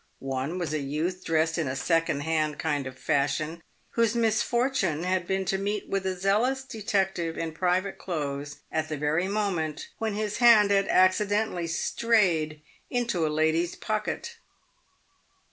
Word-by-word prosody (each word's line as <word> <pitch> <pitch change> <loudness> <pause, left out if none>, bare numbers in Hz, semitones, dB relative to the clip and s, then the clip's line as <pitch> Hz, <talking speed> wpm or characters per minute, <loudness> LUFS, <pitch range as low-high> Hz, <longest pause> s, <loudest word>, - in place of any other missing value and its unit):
One 135 +5 -3
was 170 -4 -2
a 155 - 0
youth 160 +7 -2
dressed 160 +1 +1
in 160 - 0
a 130 - -2
second 165 0 +1
hand 155 -1 0
kind 145 -4 -1
of 130 0 -9
fashion, 150 +3 0 0.3
whose 230 -1 +2
misfortune 230 - +1
had 185 -1 0
been 190 0 0
to 195 +1 0
meet 205 +1 -2
with 195 -1 -1
a 185 -1 -2
zealous 230 +8 +2
detective 195 -8 -1
in 165 -1 -2
private 185 +4 0
clothes 145 -4 -4
at 160 0 -1
the 155 - -3
very 150 +5 +1
moment 190 -7 -2
when 220 -2 -1
his 210 0 -2
hand 230 -4 +6
had 195 -1 +3
accidentally 190 -1 +2
strayed 165 -5 +1 0.3
into 235 -10 0
a - - 0
lady's 160 +3 +1
pocket. 215 - -3
180 Hz, 150 wpm, -27 LUFS, 155-210 Hz, 0.3 s, hand